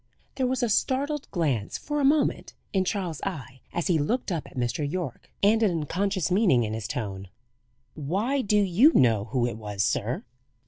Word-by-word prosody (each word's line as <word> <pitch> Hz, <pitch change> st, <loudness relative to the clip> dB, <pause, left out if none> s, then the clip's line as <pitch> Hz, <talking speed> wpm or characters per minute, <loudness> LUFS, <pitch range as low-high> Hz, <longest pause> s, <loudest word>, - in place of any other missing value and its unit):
There 260 Hz, -2 st, 0 dB
was 260 Hz, 0 st, -1 dB
a -, -, +3 dB
startled 280 Hz, +6 st, 0 dB
glance 140 Hz, -, -1 dB
for 295 Hz, 0 st, -2 dB
a -, -, 0 dB
moment 290 Hz, +2 st, +2 dB, 0.2 s
in 190 Hz, -2 st, +2 dB
Charles's 180 Hz, -6 st, -2 dB
eye, 135 Hz, -8 st, -6 dB
as 175 Hz, -, -2 dB
he 170 Hz, -4 st, +2 dB
looked 220 Hz, -, -1 dB
up 165 Hz, -4 st, -3 dB
at -, -, -14 dB
Mr. 120 Hz, +4 st, -1 dB
Yorke, 170 Hz, -9 st, -5 dB
and 220 Hz, +3 st, +4 dB
an 215 Hz, -, +4 dB
unconscious 180 Hz, +3 st, -1 dB
meaning 180 Hz, -, +4 dB
in 110 Hz, -1 st, -3 dB
his 110 Hz, -1 st, -4 dB
tone. 100 Hz, -5 st, -4 dB, 0.7 s
"Why, 200 Hz, -, -1 dB
do 210 Hz, -2 st, +2 dB
you 205 Hz, -, +5 dB
know 110 Hz, -5 st, +4 dB
who 120 Hz, +2 st, 0 dB
it 120 Hz, -2 st, -3 dB
was, 105 Hz, -2 st, -2 dB
sir?" -, -, -1 dB
175 Hz, 185 wpm, -26 LUFS, -, 0.7 s, you